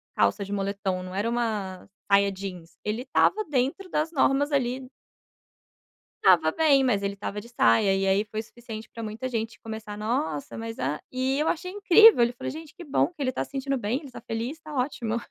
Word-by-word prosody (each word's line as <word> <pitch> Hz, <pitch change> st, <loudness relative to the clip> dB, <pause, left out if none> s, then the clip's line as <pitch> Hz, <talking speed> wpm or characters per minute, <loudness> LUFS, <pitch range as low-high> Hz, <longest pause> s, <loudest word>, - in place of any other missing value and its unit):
calça 200 Hz, -, +2 dB
de 200 Hz, -, -5 dB
moletom, 195 Hz, -2 st, -2 dB
não 185 Hz, -, -8 dB
era 205 Hz, +4 st, 0 dB
uma 210 Hz, -6 st, -2 dB, 0.2 s
saia 200 Hz, 0 st, +5 dB
jeans, 185 Hz, -4 st, -8 dB
ele 215 Hz, +3 st, -2 dB
estava 410 Hz, +10 st, +2 dB
dentro 290 Hz, +7 st, -1 dB
das 310 Hz, +1 st, 0 dB
normas 285 Hz, -1 st, +2 dB
ali. 255 Hz, -1 st, -1 dB, 1.3 s
Estava 170 Hz, -4 st, +6 dB
bem, 285 Hz, -, +4 dB
mas 230 Hz, -6 st, +2 dB
ele 200 Hz, 0 st, -1 dB
estava 200 Hz, +1 st, -5 dB
de 235 Hz, -, -13 dB
saia 195 Hz, -, +4 dB
e 195 Hz, 0 st, 0 dB
aí 195 Hz, +2 st, +3 dB
foi 215 Hz, +1 st, -4 dB
suficiente 225 Hz, -1 st, -10 dB
pra 230 Hz, -, -7 dB
muita 220 Hz, +4 st, -4 dB
gente 225 Hz, -2 st, -3 dB
começar: 220 Hz, -2 st, -7 dB
"Nossa 210 Hz, -, -2 dB
mas 225 Hz, 0 st, -5 dB
a" 145 Hz, +3 st, -2 dB
E 260 Hz, +2 st, 0 dB
eu 305 Hz, -, +1 dB
achei 365 Hz, +2 st, -2 dB
incrível, 410 Hz, -, +7 dB
ele 235 Hz, +1 st, +3 dB
falou: 240 Hz, -, -5 dB
"Gente 315 Hz, +1 st, -9 dB
que 355 Hz, -2 st, -10 dB
bom 290 Hz, -, +2 dB
que 345 Hz, -4 st, -8 dB
ele 260 Hz, -, +1 dB
tá -, -, -2 dB
se -, -, -19 dB
sentindo 275 Hz, 0 st, -1 dB
bem, 245 Hz, +6 st, -2 dB
tá 250 Hz, -, -9 dB
feliz, 235 Hz, +6 st, -4 dB
tá 310 Hz, -1 st, -9 dB
ótimo". 250 Hz, -4 st, -1 dB
230 Hz, 200 wpm, -26 LUFS, 200-275 Hz, 1.3 s, incrível